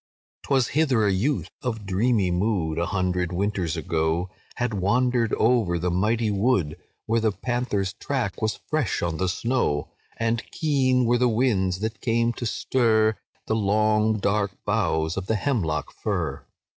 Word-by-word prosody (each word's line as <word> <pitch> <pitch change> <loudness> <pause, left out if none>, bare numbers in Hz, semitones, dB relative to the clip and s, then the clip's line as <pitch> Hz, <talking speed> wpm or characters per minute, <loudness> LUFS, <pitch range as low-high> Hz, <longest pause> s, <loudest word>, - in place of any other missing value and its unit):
"'Twas 130 -4 +1
hither 135 -8 +2
a 100 - +3
youth 125 +10 0
of 115 -5 -3
dreamy 100 0 +1
mood, 90 -4 0
A 85 - 0
hundred 90 -2 -1
winters 95 -3 -1
ago, 80 +3 -1 0.2
Had 120 -2 -1
wandered 120 +4 +1
over 110 -7 +2
the 90 +1 -1
mighty 110 +5 +1
wood, 100 -7 +1 0.3
When 115 +1 +1
the 110 -1 +2
panther's 105 -4 -2
track 120 -4 -3
was 110 0 -1
fresh 155 - -1
on 85 -2 -1
the 95 +1 0
snow; 105 - -1 0.3
And 115 0 0
keen 130 -5 +2
were 120 +1 +2
the 125 -1 +3
winds 105 -6 +1
that 110 0 -3
came 115 0 +1
to 120 0 -4
stir 110 -2 +2 0.3
The 110 - 0
long 110 +1 +2
dark 100 -1 0
boughs 80 +2 0
of 95 0 -4
the 110 - +1
hemlock 95 - -1
fir. 80 -10 -3
110 Hz, 155 wpm, -25 LUFS, 95-120 Hz, 0.3 s, a